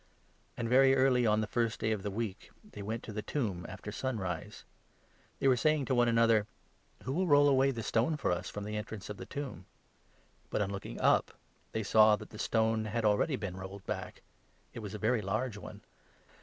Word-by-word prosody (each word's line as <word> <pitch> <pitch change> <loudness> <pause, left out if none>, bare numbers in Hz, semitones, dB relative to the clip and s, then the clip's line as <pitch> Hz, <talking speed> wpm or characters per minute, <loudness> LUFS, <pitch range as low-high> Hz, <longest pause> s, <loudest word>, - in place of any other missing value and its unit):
And 120 - -2
very 135 +2 +5
early 130 -2 +3
on 105 0 +3
the - - 0
first 115 0 -1
day 110 - 0
of 105 -3 -1
the 100 - -3
week 105 -1 -4
2 210 - -18
they - - -8
went 110 +3 -4
to 110 - -7
the 105 - -3
tomb, 100 - -3
after 105 - -7
sunrise. 100 -8 -4 0.7
They - - +1
were 130 - +6
saying 155 +1 +2
to 130 - 0
3 - - +2
one 120 0 +4
another: 115 -2 +4 0.6
"Who 130 - -3
will 185 +4 +1
roll 145 -2 +6
away 135 -1 +4
the 115 -4 -3
stone 120 +9 +1
for 140 - 0
us 90 0 -2
from 105 - -6
the 105 +1 -4
entrance 105 -1 -6
of 105 - -7
the - - -8
tomb? 140 - -6 0.4
" - - -35
But, 105 - 0
on 100 - -3
looking 100 -1 -6
up, - - +3 0.4
they 110 - -2
saw 110 +1 +6
that - - -11
the 105 - -10
stone 110 -1 +1
had 110 +1 -2
already 105 +8 +2
been 100 -7 -4
4 95 - -8
rolled 95 0 -8
back; - - -5 0.5
it - - -7
was 105 -1 -6
a - - -3
very 110 +2 +1
large 110 +3 -2
one. - - -10
110 Hz, 225 wpm, -32 LUFS, 105-130 Hz, 0.7 s, were